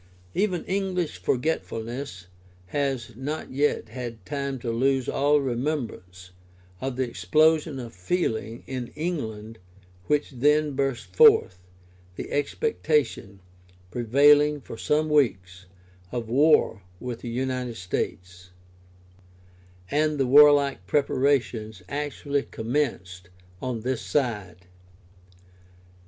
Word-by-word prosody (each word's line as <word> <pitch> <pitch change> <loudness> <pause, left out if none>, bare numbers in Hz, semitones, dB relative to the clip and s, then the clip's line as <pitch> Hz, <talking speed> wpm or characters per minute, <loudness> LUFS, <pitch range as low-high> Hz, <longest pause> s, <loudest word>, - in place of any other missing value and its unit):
Even 190 -4 0
English 185 -3 -2
forgetfulness 125 - -2 0.4
has 135 -5 -2
not 145 +6 -5
yet 145 +3 0
had 115 -6 -7
time 140 -2 -3
to 120 -1 -3
lose 130 +2 +1
all 145 +2 +3
remembrance 120 - -4 0.5
of 135 -1 -3
the 130 0 -1
explosion 150 - +2
of 120 -2 -8
feeling 110 - -2
in 130 -2 -4
England 115 - -4 0.5
which 150 -1 +1
then 150 +4 +2
burst 120 -9 -2
forth, 90 0 +6 0.6
the - - -7
expectation, 145 - -1 0.5
prevailing 145 +6 +4
for 130 - -9
some 150 +6 +1
weeks, 95 -11 0 0.4
of 120 -2 -3
war 140 -4 +4 0.2
with 125 -2 -5
the 120 - -5
United 125 0 -2
States, 90 0 -4 1.4
and 150 +1 +1
the 135 - +2
warlike 140 -5 +5
preparations 125 -6 0
actually 145 0 -2
commenced 110 -10 -3 0.3
on 125 -3 -3
this 125 +1 -2
side. 105 - -2
130 Hz, 100 wpm, -25 LUFS, 110-145 Hz, 1.4 s, forth